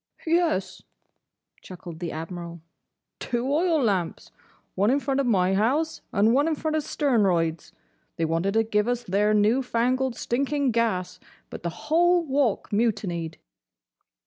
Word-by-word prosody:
"Yes," 330 Hz, -, 0 dB, 0.8 s
chuckled 175 Hz, -3 st, -10 dB
the 175 Hz, -2 st, -4 dB
Admiral, 170 Hz, +1 st, -7 dB, 0.6 s
"two 250 Hz, +3 st, -2 dB
oil 330 Hz, +1 st, +2 dB
lamps. 190 Hz, -7 st, -1 dB, 0.4 s
One 200 Hz, +3 st, +2 dB
in 275 Hz, +3 st, +3 dB
front 275 Hz, -1 st, -1 dB
of 275 Hz, -, +1 dB
my 190 Hz, -4 st, +2 dB
house, 275 Hz, +11 st, 0 dB
and 215 Hz, +3 st, +3 dB
one 285 Hz, +4 st, +3 dB
in 320 Hz, -, +1 dB
front 310 Hz, +1 st, -2 dB
of 310 Hz, -, +1 dB
Sternroyd's. 195 Hz, -, 0 dB, 0.4 s
They 165 Hz, -, -1 dB
wanted 165 Hz, +5 st, -1 dB
to 225 Hz, -, +4 dB
give 210 Hz, 0 st, 0 dB
us 245 Hz, 0 st, -1 dB
their 210 Hz, +2 st, +1 dB
new 215 Hz, +5 st, +3 dB
fangled, 255 Hz, +1 st, 0 dB
stinking 275 Hz, +3 st, 0 dB
gas, 220 Hz, -6 st, -1 dB, 0.3 s
but -, -, -7 dB
the 170 Hz, -, -2 dB
whole 345 Hz, -, +2 dB
Walk 265 Hz, -8 st, 0 dB
mutinied." 195 Hz, -7 st, -1 dB
225 Hz, 145 wpm, -25 LUFS, 185-275 Hz, 0.8 s, to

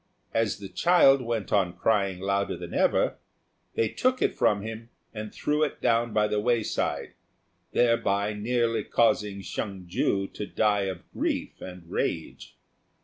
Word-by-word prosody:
As 115 Hz, -1 st, +1 dB
the 100 Hz, -, -8 dB
child 140 Hz, -, +5 dB
went 115 Hz, -3 st, -3 dB
on 95 Hz, -4 st, +2 dB
crying 100 Hz, -1 st, +1 dB
louder 100 Hz, +1 st, 0 dB
than -, -, -8 dB
ever, -, -, +2 dB, 0.6 s
they 115 Hz, -, +2 dB
took 255 Hz, -, 0 dB
it -, -, +1 dB
from 100 Hz, -1 st, +2 dB
him 115 Hz, +1 st, -7 dB, 0.2 s
and 105 Hz, -1 st, -6 dB
threw 150 Hz, +1 st, -1 dB
it 155 Hz, -, 0 dB
down 115 Hz, 0 st, +2 dB
by 105 Hz, 0 st, +2 dB
the 105 Hz, -, 0 dB
wayside, 115 Hz, 0 st, -1 dB, 0.6 s
thereby 105 Hz, -4 st, +2 dB
nearly 115 Hz, +1 st, 0 dB
causing 105 Hz, -3 st, +1 dB
Hsiang 95 Hz, -3 st, -5 dB
ju 95 Hz, +1 st, 0 dB
to 105 Hz, +1 st, -7 dB
die 105 Hz, -2 st, +1 dB
of 95 Hz, -2 st, -6 dB
grief -, -, -2 dB
and 90 Hz, -2 st, -9 dB
rage. 80 Hz, -1 st, -3 dB
105 Hz, 145 wpm, -27 LUFS, 100-115 Hz, 0.6 s, child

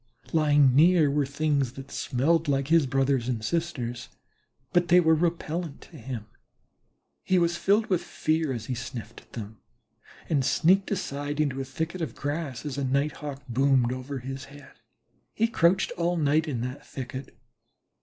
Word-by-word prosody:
Lying 145 Hz, -4 st, +5 dB
near 160 Hz, -1 st, +5 dB
were 145 Hz, -1 st, +1 dB
things 140 Hz, -3 st, 0 dB
that 135 Hz, 0 st, -10 dB
smelled 155 Hz, +5 st, +1 dB
like 135 Hz, 0 st, 0 dB
his 165 Hz, -4 st, +4 dB
brothers 135 Hz, -2 st, +1 dB
and 110 Hz, -3 st, -2 dB
sisters, 120 Hz, -6 st, -3 dB, 0.6 s
but 175 Hz, 0 st, +3 dB
they 175 Hz, +2 st, +6 dB
were 160 Hz, -2 st, +4 dB
repellent 165 Hz, -1 st, -1 dB
to 165 Hz, -, -13 dB
him. 120 Hz, -4 st, -6 dB, 1.0 s
He 185 Hz, -, +2 dB
was 170 Hz, -1 st, +2 dB
filled 205 Hz, +5 st, +2 dB
with 185 Hz, -5 st, +1 dB
fear 155 Hz, -2 st, -1 dB
as 115 Hz, -3 st, -4 dB
he 130 Hz, -, -3 dB
sniffed 115 Hz, -3 st, -7 dB
at -, -, -28 dB
them, 110 Hz, -2 st, -7 dB, 0.7 s
and 145 Hz, -4 st, +1 dB
sneaked 190 Hz, +9 st, +3 dB
aside 145 Hz, -6 st, -3 dB
into 135 Hz, -3 st, 0 dB
a -, -, -4 dB
thicket 160 Hz, +7 st, -4 dB
of 160 Hz, -, -3 dB
grass, 145 Hz, -2 st, -4 dB
as 140 Hz, -2 st, -3 dB
a -, -, -1 dB
Night 140 Hz, +3 st, 0 dB
hawk 140 Hz, -2 st, -7 dB
boomed 130 Hz, 0 st, +2 dB
over 130 Hz, +2 st, -5 dB
his 135 Hz, +1 st, -6 dB
head. 145 Hz, 0 st, -14 dB, 0.6 s
He 225 Hz, -, +2 dB
crouched 190 Hz, -4 st, +2 dB
all 175 Hz, +1 st, 0 dB
night 155 Hz, +1 st, +2 dB
in 125 Hz, -6 st, -2 dB
that 130 Hz, +4 st, -5 dB
thicket. 130 Hz, 0 st, -7 dB
145 Hz, 165 wpm, -27 LUFS, 130-165 Hz, 1.0 s, they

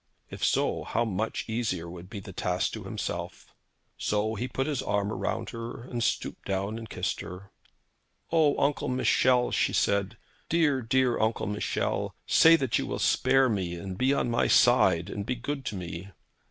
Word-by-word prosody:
If -, -, -7 dB
so, -, -, +1 dB
how 115 Hz, -, 0 dB
much 110 Hz, +1 st, -2 dB
easier 110 Hz, -7 st, -2 dB
would 90 Hz, +1 st, -10 dB
the 100 Hz, -2 st, -8 dB
task 90 Hz, 0 st, -1 dB
be -, -, -4 dB
to -, -, -10 dB
himself! -, -, -5 dB, 0.5 s
So 105 Hz, +1 st, 0 dB
he 120 Hz, +4 st, -3 dB
put 135 Hz, +1 st, -2 dB
his 140 Hz, -3 st, -1 dB
arm 100 Hz, -3 st, 0 dB
round 115 Hz, 0 st, -3 dB
her, 115 Hz, 0 st, -7 dB
and 120 Hz, -2 st, -3 dB
stooped -, -, -2 dB
down 100 Hz, +3 st, -2 dB
and 115 Hz, -2 st, -9 dB
kissed -, -, -2 dB
her. 95 Hz, +3 st, -9 dB, 0.8 s
'O, 160 Hz, -3 st, +3 dB
Uncle 145 Hz, 0 st, +1 dB
Michel,' 125 Hz, -1 st, +3 dB
she -, -, +1 dB
said; 100 Hz, -1 st, +1 dB, 0.3 s
'dear, 150 Hz, -5 st, +2 dB
dear 125 Hz, +1 st, +2 dB
Uncle 110 Hz, +1 st, 0 dB
Michel; 105 Hz, +1 st, -2 dB
say 165 Hz, +1 st, +7 dB
that 135 Hz, -7 st, 0 dB
you -, -, -3 dB
will -, -, -3 dB
spare 135 Hz, 0 st, +3 dB
me, 95 Hz, -7 st, -1 dB
and 95 Hz, +2 st, -6 dB
be 130 Hz, +7 st, +2 dB
on 140 Hz, -3 st, +1 dB
my 115 Hz, -, +2 dB
side, 95 Hz, -9 st, +4 dB
and 100 Hz, 0 st, -4 dB
be 125 Hz, +5 st, -2 dB
good 135 Hz, +2 st, -4 dB
to 105 Hz, -, -3 dB
me.' 90 Hz, +1 st, -6 dB
115 Hz, 180 wpm, -28 LUFS, 100-130 Hz, 0.8 s, say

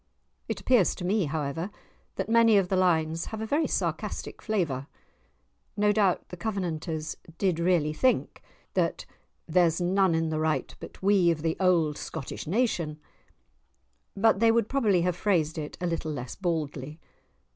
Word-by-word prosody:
It -, -, -3 dB
appears 245 Hz, -8 st, +3 dB
to 180 Hz, -, -6 dB
me, 200 Hz, 0 st, +2 dB
however, 155 Hz, +4 st, -3 dB, 0.5 s
that -, -, -3 dB
many 230 Hz, -1 st, +5 dB
of 190 Hz, -2 st, +2 dB
the 190 Hz, -, +1 dB
lines 165 Hz, -3 st, +1 dB
have 220 Hz, -, -6 dB
a 220 Hz, -, -3 dB
very 290 Hz, +8 st, +1 dB
sarcastic -, -, -3 dB
flavour; 160 Hz, -, -1 dB, 0.9 s
no 210 Hz, 0 st, +3 dB
doubt 200 Hz, -4 st, +1 dB
the 180 Hz, -, -8 dB
Covenanters 170 Hz, -6 st, -3 dB, 0.2 s
did 185 Hz, -4 st, +1 dB
really 170 Hz, -3 st, +2 dB
think 255 Hz, +11 st, +1 dB, 0.3 s
that -, -, 0 dB, 0.4 s
"There's 170 Hz, -1 st, +3 dB
none 185 Hz, 0 st, +2 dB
in 160 Hz, 0 st, 0 dB
the 155 Hz, 0 st, -1 dB
right 155 Hz, 0 st, -1 dB
but -, -, -11 dB
we, 195 Hz, -3 st, +4 dB
Of 160 Hz, -2 st, -1 dB
the 165 Hz, -1 st, 0 dB
old 170 Hz, -5 st, +2 dB
Scottish 135 Hz, -, -6 dB
nation"; 170 Hz, -7 st, 0 dB, 1.2 s
but 215 Hz, 0 st, +4 dB
they 230 Hz, 0 st, +5 dB
would 230 Hz, -1 st, +2 dB
probably 215 Hz, -10 st, +2 dB
have 180 Hz, -1 st, 0 dB
phrased 170 Hz, -5 st, 0 dB
it 150 Hz, -1 st, -6 dB
a 180 Hz, -, -2 dB
little 165 Hz, -2 st, -2 dB
less 130 Hz, -4 st, -5 dB
baldly. 155 Hz, -5 st, -3 dB
175 Hz, 155 wpm, -27 LUFS, 160-200 Hz, 1.2 s, many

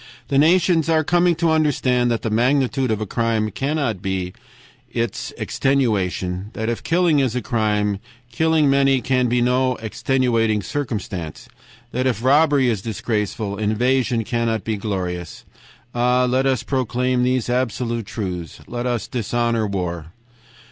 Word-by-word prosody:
The 140 Hz, -, +3 dB
nations 165 Hz, 0 st, +3 dB
are 160 Hz, -1 st, +3 dB
coming 175 Hz, +2 st, +3 dB
to 165 Hz, 0 st, +1 dB
understand 130 Hz, -6 st, +2 dB
that 115 Hz, -1 st, -1 dB
the 115 Hz, -, -1 dB
magnitude 130 Hz, +3 st, +1 dB
of 110 Hz, -1 st, -1 dB
a -, -, -1 dB
crime 110 Hz, 0 st, 0 dB
cannot 135 Hz, -, -1 dB
be 95 Hz, -2 st, -3 dB, 0.6 s
its 115 Hz, 0 st, -3 dB
extenuation; 100 Hz, -8 st, 0 dB
that 110 Hz, +1 st, -3 dB
if 120 Hz, -, -2 dB
killing 170 Hz, -3 st, +2 dB
is 130 Hz, -4 st, 0 dB
a 125 Hz, -, -1 dB
crime, 105 Hz, -4 st, 0 dB, 0.3 s
killing 160 Hz, +2 st, +2 dB
many 135 Hz, -1 st, +3 dB
can 125 Hz, 0 st, +1 dB
be 120 Hz, 0 st, +2 dB
no 125 Hz, +1 st, +2 dB
extenuating 115 Hz, -2 st, 0 dB
circumstance; 110 Hz, -, -4 dB, 0.4 s
that 130 Hz, +2 st, 0 dB
if 115 Hz, -3 st, -1 dB
robbery 145 Hz, 0 st, +4 dB
is 110 Hz, -5 st, 0 dB
disgraceful, 105 Hz, -1 st, -3 dB
invasion 120 Hz, +2 st, +1 dB
cannot 115 Hz, -1 st, -1 dB
be 110 Hz, -, -1 dB
glorious. 90 Hz, -5 st, -4 dB, 0.5 s
Ah! 125 Hz, +1 st, +2 dB
let 130 Hz, +2 st, +1 dB
us 130 Hz, -4 st, +1 dB
proclaim 125 Hz, -1 st, 0 dB
these 125 Hz, -1 st, +1 dB
absolute 120 Hz, -2 st, -1 dB
truths; 90 Hz, -, -5 dB
let 120 Hz, +1 st, -3 dB
us 120 Hz, -2 st, -2 dB
dishonor 115 Hz, -1 st, -1 dB
war!' 85 Hz, -5 st, -3 dB
120 Hz, 140 wpm, -21 LUFS, 110-135 Hz, 0.6 s, robbery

